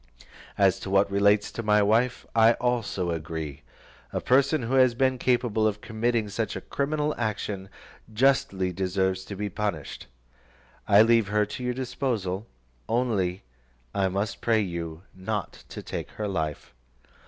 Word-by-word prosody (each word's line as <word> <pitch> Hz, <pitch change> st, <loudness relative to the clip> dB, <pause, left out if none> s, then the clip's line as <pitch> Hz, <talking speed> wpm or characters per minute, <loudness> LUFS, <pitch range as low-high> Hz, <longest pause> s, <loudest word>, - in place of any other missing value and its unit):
As -, -, +3 dB
to -, -, -6 dB
what 100 Hz, +1 st, +3 dB
relates 100 Hz, +1 st, +3 dB
to -, -, -4 dB
my 105 Hz, -1 st, +3 dB
wife, 115 Hz, +4 st, +2 dB
I 115 Hz, +1 st, +6 dB
also 115 Hz, -8 st, -1 dB
agree; 80 Hz, -3 st, -5 dB, 0.5 s
a -, -, -1 dB
person 135 Hz, +2 st, +3 dB
who 120 Hz, +3 st, -2 dB
has 130 Hz, -2 st, +5 dB
been 130 Hz, 0 st, +1 dB
capable 120 Hz, -4 st, +2 dB
of 105 Hz, -1 st, -2 dB
committing 115 Hz, 0 st, -1 dB
such 110 Hz, +2 st, -3 dB
a -, -, -4 dB
criminal 150 Hz, +1 st, -1 dB
action, 105 Hz, -3 st, -3 dB, 0.4 s
justly 105 Hz, -6 st, +2 dB
deserves 95 Hz, 0 st, 0 dB
to 100 Hz, -, -7 dB
be 105 Hz, +2 st, -3 dB
punished. 100 Hz, -6 st, -4 dB, 0.8 s
I 105 Hz, +1 st, +7 dB
leave 115 Hz, -2 st, +4 dB
her 105 Hz, +1 st, +2 dB
to 125 Hz, -, -7 dB
your 125 Hz, 0 st, -1 dB
disposal, 115 Hz, -6 st, -2 dB, 0.4 s
only 105 Hz, -7 st, 0 dB, 0.5 s
I 95 Hz, -1 st, +1 dB
must 100 Hz, +2 st, -3 dB
pray 115 Hz, -1 st, +3 dB
you 85 Hz, -3 st, -5 dB
not 100 Hz, +2 st, -5 dB
to -, -, -8 dB
take -, -, -5 dB
her 105 Hz, -, -3 dB
life." 80 Hz, -9 st, -3 dB
105 Hz, 150 wpm, -26 LUFS, 95-120 Hz, 0.8 s, I